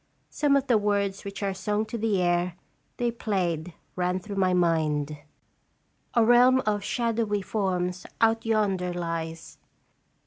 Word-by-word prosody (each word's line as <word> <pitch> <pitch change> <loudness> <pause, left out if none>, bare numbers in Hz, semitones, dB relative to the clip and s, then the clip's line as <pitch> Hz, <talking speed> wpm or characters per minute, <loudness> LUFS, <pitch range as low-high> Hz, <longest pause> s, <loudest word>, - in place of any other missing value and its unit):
Some 290 -2 +2
of 275 -1 +2
the 240 -5 +3
words 200 -1 0
which 200 +1 -6
are 195 -1 0
sung 210 +3 -1
to 235 - -7
the 220 -3 0
air 175 0 +1 0.4
they 240 -1 0
played 180 -7 -2 0.2
ran 180 0 0
through 200 +1 -7
my 185 -1 +3
mind: 155 -4 +1 1.0
"A 235 -2 +5
realm 250 +2 +6
of 205 -1 0
shadowy 225 -3 -1
forms 185 -3 -2
out 225 0 +3
yonder 195 -5 0
lies. 165 -1 -5
200 Hz, 140 wpm, -26 LUFS, 180-225 Hz, 1.0 s, realm